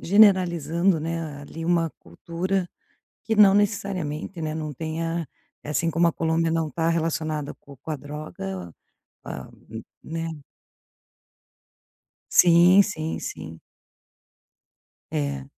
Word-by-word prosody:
generalizando, 180 -3 +4
né, 160 -2 -4
ali, 165 +3 -8
uma 170 -1 +2
cultura 175 - -3 0.6
que 220 - 0
não 200 -2 +8
necessariamente, 190 -5 -1
né, 155 0 -2
não 155 -1 -4
tenha 165 +2 -3 0.4
eh, - - -7
assim 165 +2 +1
como 170 +1 +3
a - - +2
Colômbia 165 0 +1
não 165 -1 0
está 165 +3 -1
relacionada 155 -3 -1
com 140 - -15
com 155 +5 -7
a - - -1
droga, 95 - -7 0.5
com - - -8
a 65 - -7 0.5
né. 165 +1 -4 2.0
Sim, 175 +3 +7
sim, 160 -6 -3
sim. 80 +1 -7 1.5
É. 70 -2 -2
165 Hz, 115 wpm, -25 LUFS, 150-175 Hz, 2.0 s, não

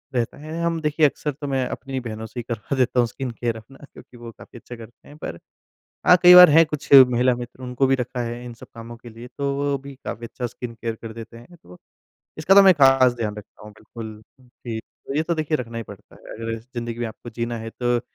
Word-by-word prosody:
रहता 120 -2 -1
है। 155 +3 -7
हम 170 -1 0
देखिए 150 0 +2
अक्सर 150 +1 -1
तो 145 +1 -8
मैं 135 -2 0
अपनी 135 0 -5
बहनों 110 -2 -7
से 115 +3 -8
ही 120 - -5
करवा 115 +4 -3
देता 125 0 +1
हूँ 120 - +3
स्किन 130 +1 -6
केयर 115 0 -3
अपना 130 +5 -15 0.2
क्योंकि 125 - -15
वो 120 -1 -10
काफ़ी 120 - -15
अच्छा 120 - -10
करते 115 0 -15
हैं। 145 - -14
पर 85 - -7 0.7
हाँ, 180 - +8
कई 180 0 +9
बार 180 -2 +10
हैं 165 +3 +7
कुछ 150 -2 -6
महिला 125 -1 +6
मित्र, 120 +1 -9
उनको 125 +1 0
भी 135 - +3
रखा 125 -1 -4
है 120 +1 -6
इन 120 - -8
सब 115 - -14
कामों 115 +1 -10
के 120 +1 -13
लिए, 115 +2 -11
तो 140 -1 -1
वो 140 0 -1
भी 140 +1 -11
काफ़ी 115 - -6
अच्छा 125 +1 -5
स्किन 120 0 -8
केयर 115 0 -4
कर 115 - -7
देते 115 +1 -10
हैं। 120 +10 -15
तो 90 0 -15 0.6
इसका 165 +5 +3
तो 200 - +9
मैं 190 -1 +7
ख़ास 135 -3 +5
ध्यान 110 -3 -4
रखता 105 - -13
हूँ 105 - -11
बिल्कुल 110 0 -10 0.4
ही, 115 -1 -4 0.4
ये 155 - +2
तो 170 +1 -1
देखिए 155 0 -1
रखना 115 -4 -7
ही - - -4
पड़ता 100 - -14
है। - - -19
अगर 115 0 -4 0.2
जिंदगी 120 -1 -5
में 120 - -2
आपको 115 +2 -10
जीना 120 0 -3
है 115 0 -7
तो 120 0 +1
120 Hz, 245 wpm, -22 LUFS, 115-140 Hz, 0.7 s, बार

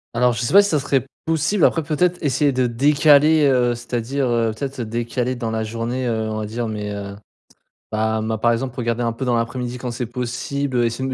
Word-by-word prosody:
Alors 125 +1 +3
je 115 - -3
sais 120 - -1
pas 200 +1 +8
si 200 - -1
ça 155 - +2
serait 135 -2 0 0.2
possible 165 +3 +1
après 165 - +2
peut-être 175 +5 +1
essayer 145 0 +2
de 130 -1 +1
décaler, 145 +5 +4
heu, 125 -3 +3
c'est-à-dire, 120 +3 -2
heu, 115 -2 +1
peut-être, 135 +2 -5
heu, 120 - -2
décaler 120 +3 -2
dans 115 -2 -3
la 110 0 -1
journée, 115 +3 -3
heu, 110 -2 -1
on 110 - -3
va 105 - -4
dire 115 +2 -3
mais, 105 -1 -4
heu, 100 -1 -6 0.8
bah 110 0 0
moi 110 0 -2
par 120 +2 +3
exemple 125 +1 -3
regarder 120 -1 -1
un 115 -1 0
peu 130 - -4
dans 125 -2 +1
l'après-midi 120 +1 -3
quand 125 0 -4
c'est 120 +1 -3
possible 125 +2 -2
essayer 115 +3 -2
de - - -3
120 Hz, 225 wpm, -21 LUFS, 115-140 Hz, 0.8 s, pas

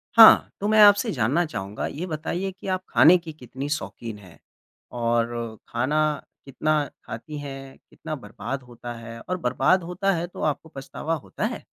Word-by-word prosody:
हाँ। 225 -1 +9
तो 205 - -1
मैं 215 0 +5
आपसे 205 0 +6
जानना 140 +7 +1
चाहूँगा। 100 -6 -5
ये 170 +5 -5
बताइए 175 +4 -3
कि 190 +1 -11
आप 185 -1 -1
ख़ाने 180 +3 +7
की 165 -2 -9
कितनी 135 0 -7
शौकीन 120 -7 -4
हैं? 90 -6 -16 0.6
और 115 -1 -1
खाना 150 +5 +1 0.2
कितना 150 +2 0 0.2
ख़ाती 125 +8 -7
हैं, 135 -1 -8
कितना 155 -1 -6
बर्बाद 135 -1 -6
होता 120 0 -8
है 115 0 -9
और 185 +7 -3
बर्बाद 135 +5 +2
होता 180 +3 0
है 170 +1 -2
तो - - -10
आपको 155 +1 -1
पछतावा 150 +3 -4
होता 155 - -5
है? - - -4
145 Hz, 170 wpm, -25 LUFS, 120-170 Hz, 0.6 s, हाँ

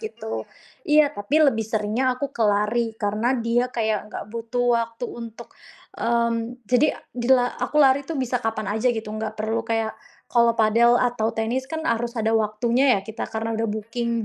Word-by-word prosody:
gitu. 115 - -5 0.4
Iya, 300 -1 +4
tapi 205 +10 0
lebih 225 -5 +2
seringnya 220 +4 -1
aku 280 0 -4
ke 235 - -1
lari 220 +2 +1
karena 220 +5 0
dia 240 +2 0
kayak 220 -3 -1
enggak - - -6
butuh 235 +2 -2 0.2
waktu 230 +1 -6
untuk, 230 0 -9 0.4
mmm, 235 +1 0
jadi 255 +4 +2 0.2
dila 245 0 +3 0.2
aku - - -2
lari 275 -1 +5
itu 300 0 -5
bisa 250 -1 -1
kapan 220 -2 -2
aja 220 +3 +2
gitu, 225 -2 -4
enggak 215 0 -5
perlu 220 +1 -1
kayak, 225 -1 -1 0.4
kalau 235 -1 +4
padel 230 +2 +5
atau 240 -3 +1
tenis 235 +4 -2
kan 320 0 -4
harus 235 +1 -1
ada 220 0 +1
waktunya 230 +3 +2
ya, - - -6
kita 220 0 -5
karena 225 +1 -3
udah 225 0 -1
booking 230 +2 -2
230 Hz, 175 wpm, -23 LUFS, 220-245 Hz, 0.4 s, lari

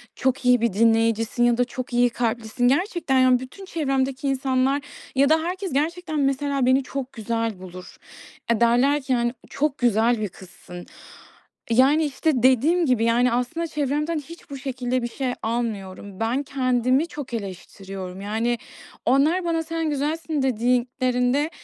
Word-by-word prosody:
"Çok 260 0 -1
iyi 245 -2 +5
bir 235 -4 +1
dinleyicisin." 225 +2 +2
Ya 240 -1 +3
da 245 - +3
"Çok 245 0 -6
iyi 245 0 +4
kalplisin." 235 0 -1
Gerçekten, 285 -1 +1
yani, 255 -1 +5
bütün 320 +10 -10
çevremdeki 275 -5 -1
insanlar 270 +1 +1 0.3
ya 275 +1 +4
da 315 +1 +3
herkes, 365 0 -4
gerçekten, 315 +2 -1
mesela, 275 -1 0
beni 260 +2 +3
çok 270 0 -5
güzel 225 -2 -2
bulur. 185 0 -10 0.6
Eee, 230 0 +1
derler 255 +5 +3
ki, 265 -1 0
hani, 240 0 0 0.2
"Çok 285 0 -1
güzel 235 0 +2
bir 210 - -2
kızsın." 180 -1 -12 0.9
Yani, 275 +6 +4
işte, 295 +3 0
dediğim 295 +8 +4
gibi, 250 -5 +2
yani 240 +1 +3
aslında 250 +8 -1
çevremden 300 +2 -1
hiç 330 +2 -13
bu 275 - -6
şekilde 255 -2 -2
bir - - -1
şey 250 +1 -3
almıyorum. 205 -4 -4
Ben 235 +5 0
kendimi 255 +2 +1
çok 290 -7 -8
eleştiriyorum. 195 -2 -7
Yani, 225 +4 -1 0.5
onlar 300 +8 +3
bana 330 -1 0
"Sen 325 -1 -2
güzelsin." 300 +1 -2
dediklerinde, 250 +3 +1
255 Hz, 150 wpm, -23 LUFS, 235-285 Hz, 0.9 s, iyi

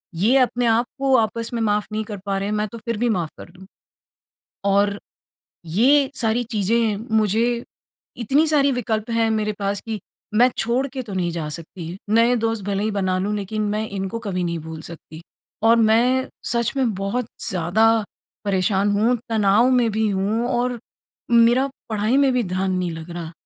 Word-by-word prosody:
ये 215 +10 +3
अपने 245 -1 +2
आपको 245 +4 +1
आपस 230 0 -1
में 235 - -1
माफ़ 210 -1 +1
नहीं 215 0 -2
कर 205 -1 -6
पा 195 -1 -1
रहे 195 +1 -2
हैं - - -1
मैं 210 0 0
तो 235 - -7
फिर 230 0 -4
भी 240 +2 +1
माफ 175 -7 -1
कर - - -11
दूँ। 185 +2 -15 1.1
और 200 +1 +2 0.7
ये 265 - +3
सारी 230 +1 0
चीज़ें 220 +1 +1 0.2
मुझे 230 +3 +1 0.5
इतनी 270 +7 +2
सारी 285 -3 +3
विकल्प 220 -3 -2
हैं 230 -1 +2
मेरे 215 -1 0
पास 200 -1 -2
कि 220 -2 -4 0.3
मैं 240 +4 +6
छोड़ 245 +4 +1
के 260 0 -5
तो 220 -4 -9
नहीं 180 -2 0
जा 165 -2 -4
सकती। 165 +2 -7
नए 230 +3 +4
दोस्त 225 -3 -1
भले 200 0 -1
ही 215 - 0
बना 190 -3 0
लूँ 200 +3 -1
लेकिन 210 +2 -3
मैं 215 +1 -2
इनको 195 +2 -4
कभी 190 -5 -3
नहीं 170 -1 -2
भूल 160 0 -8
सकती। 160 -1 -11 0.4
और 225 +1 +5
मैं 235 +4 +3 0.2
सच 235 -1 0
में 255 -4 +1
बहुत 200 +6 -2 0.2
ज़्यादा 190 +6 +3 0.5
परेशान 195 0 +1
हूँ 230 +4 +3
तनाव 220 +2 +3
में 245 -3 +3
भी 220 +1 +1
हूँ 205 +4 0
और 245 0 0 0.5
मेरा 235 +3 +5 0.2
पढ़ाई 215 +4 +1
में 275 -1 +4
भी 250 -1 +1
ध्यान 185 +1 -1
नहीं 180 -1 -1
लग 160 +1 -8
रहा। 170 -1 -6
215 Hz, 180 wpm, -22 LUFS, 195-235 Hz, 1.1 s, मैं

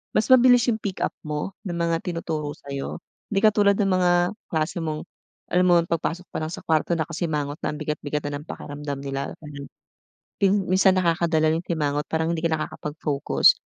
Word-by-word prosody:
mas 215 +4 +2
mabilis 245 -1 +6
'yung 220 - -2
pick 195 -3 -3
up - - 0 0.2
mo 150 +5 -3 0.2
ng 175 - -3
mga 170 -1 +1
tinuturo 160 -4 -3
sa'yo. 140 -1 -6 0.2
Hindi 195 -2 0
katulad 205 -2 +5
ng 195 -2 +1
mga 180 -1 +3 0.4
kaklase 160 +2 -1
mong 155 -2 -3 0.5
alam 180 +1 +4
mo 175 - +6
ang - - -10
pagpasok 170 +2 -1
pa - - -3
lang 155 +1 -3
sa - - -7
kwarto 160 +2 +1
nakasimangot 155 -2 -2
na 150 - -2
ang - - -8
bigat-bigat 150 -1 -3
na 145 - -3
ng 150 - -14
pakiramdam 145 -1 -6
nila, 135 0 -4
mhm, 140 -1 -8 0.8
ping 195 0 +3
minsan 185 0 +4
nakakadala 165 -2 +2
'yung 165 - -2
simangot 150 -4 -1
parang 160 +1 0
hindi 160 - -4
ka 165 - +1
nakakapag-focus, 150 -2 +2
165 Hz, 185 wpm, -24 LUFS, 150-185 Hz, 0.8 s, mabilis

